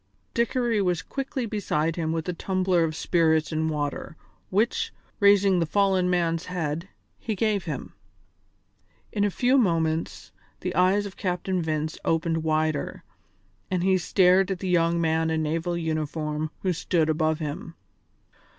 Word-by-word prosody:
Dickory 235 -2 +1
was 180 -3 0
quickly 270 +1 -3
beside 165 -7 -1
him 160 -2 -1
with 165 0 -2
a 180 - -1
tumbler 185 -1 +1
of 155 -1 -1
spirits 160 0 +2
and 160 0 0
water, 150 0 -3 0.3
which, 215 +6 +1 0.3
raising 200 -2 +5
the 165 - 0
fallen 190 0 +2
man's 170 -2 0
head, 170 0 -3 0.3
he 220 - -3
gave 205 -1 0
him. 150 -5 -5 1.2
In 205 - 0
a 205 - +3
few 250 +7 +3
moments 165 - 0 0.3
the - - -2
eyes 185 +4 +3
of 200 - -8
Captain 185 -1 -1
Vince 155 0 -2
opened 165 0 0
wider, 155 -1 -1 0.7
and 180 -2 0
he 190 0 +3
stared 185 +2 +4
at 190 - -1
the 190 - -5
young 170 -1 +2
man 160 0 +1
in 160 -1 0
naval 165 +3 -1
uniform 155 -1 -2
who 185 -2 +1
stood 165 -1 +1
above 155 0 +1
him. 155 +1 -5
170 Hz, 150 wpm, -26 LUFS, 160-190 Hz, 1.2 s, raising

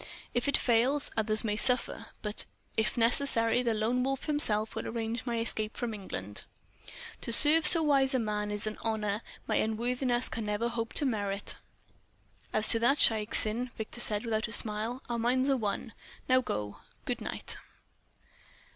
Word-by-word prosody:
"If 245 - -1
it 280 - +3
fail, 245 +4 +2 0.2
others 215 0 -1
may 210 -2 -1
suffer, 245 -1 -1 0.2
but 210 0 -2 0.3
if 220 +3 0
necessary 230 -1 +2
the 235 -3 -1
Lone 235 +4 0
Wolf 270 0 -2
himself 220 -8 0
will - - -5
arrange 230 +1 -4
my 235 -1 -1
escape 220 -1 0
from 240 -2 -3
England." 105 - -6 0.8
"To - - -4
serve 305 +5 +8
so 325 +1 +6
wise 275 -2 +2
a - - +3
man 210 -2 -2
is 210 0 -3
an 215 0 -5
honour 215 -2 -2 0.2
my - - 0
unworthiness 245 +3 -1
can 225 -1 -4
never 210 +3 -1
hope 230 -1 -4
to 295 - -1
merit." 205 -5 -2 0.9
"As 215 0 +4
to 230 - +10
that, 255 +5 +2
Shaik 215 -5 +3
Tsin," 230 +4 +1
Victor 220 +2 -6
said 210 0 +1
without 220 -1 -1
a - - -10
smile, 225 +3 -2
"our 235 -1 -3
minds 255 +4 +1
are 270 - +2
one. 220 +1 -4 0.3
Go 255 0 +4
now. 105 -1 -4 0.3
Good - - -3
night." - - -4
230 Hz, 170 wpm, -29 LUFS, 215-250 Hz, 0.9 s, to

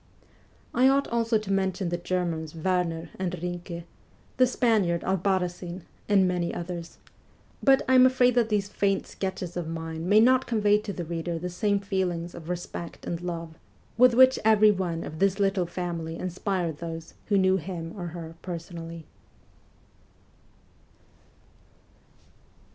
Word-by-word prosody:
I 255 +2 +5
ought 275 +1 +3
also 230 -1 +2
to 210 -2 -5
mention 190 -1 0
the 175 - -1
Germans 170 -3 -2
Werner 170 -1 -1
and 185 -2 -2
Binke, 175 0 -5 0.5
the 255 -1 +5
Spaniard 215 -9 +1
Albarracin, 185 -1 -1 0.3
and 195 -2 +5
many 175 -1 -1
others; 170 -1 -6 0.6
but 270 -1 +5
I 260 - +3
am 255 0 +8
afraid 250 -1 +3
that 235 -2 +2
these 205 -2 +1
faint 200 -1 0
sketches 185 -2 -5
of 175 -2 -3
mine 165 +1 -4
may 210 +1 +7
not 255 +3 +4
convey 210 -3 +3
to 210 -1 -5
the 175 -3 -5
reader 170 +1 -3
the 180 +2 -4
same 200 +2 +1
feelings 180 -4 -2
of 165 0 -9
respect 175 -1 -6
and 170 0 -3
love 165 -2 -5 0.4
with 250 0 +6
which 260 +1 +6
every 215 -1 +6
one 180 -4 -2
of 155 - -7
this 195 0 +2
little 195 -3 +1
family 170 -2 -4
inspired 180 -3 -2
those 165 -1 -6
who 205 - +3
knew 190 0 +4
him 170 -2 -6
or 175 -3 -5
her 165 -1 -7
personally. 170 -2 -7
180 Hz, 145 wpm, -27 LUFS, 170-205 Hz, 0.6 s, am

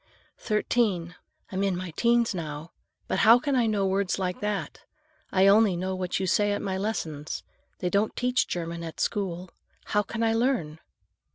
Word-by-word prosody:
"Thirteen. 210 -5 0 0.4
I'm 190 0 -2
in 195 -3 +1
my 180 -1 -5
'teens 235 +6 +2
now. 155 -2 -6 0.4
But 190 - 0
how 225 +2 +8
can 280 +2 -1
I 240 -3 +3
know 205 -3 +1
words 190 -1 0
like 180 -1 -2
that? 205 -7 -3 0.5
I 190 0 +4
only 200 -2 +5
know 185 +2 -2
what 185 -1 -2
you 190 - -1
say 205 +3 +2
at - - -2
my 190 -1 -2
lessons. 165 -7 -3 0.3
They 180 - -2
don't 205 +2 +1
teach 250 0 +1
German 170 -1 -4
at 165 -1 -7
school. 185 -4 -2 0.4
How 210 - +4
can 230 +3 -4
I 225 0 +3
learn?" 225 - 0
195 Hz, 175 wpm, -27 LUFS, 175-220 Hz, 0.5 s, how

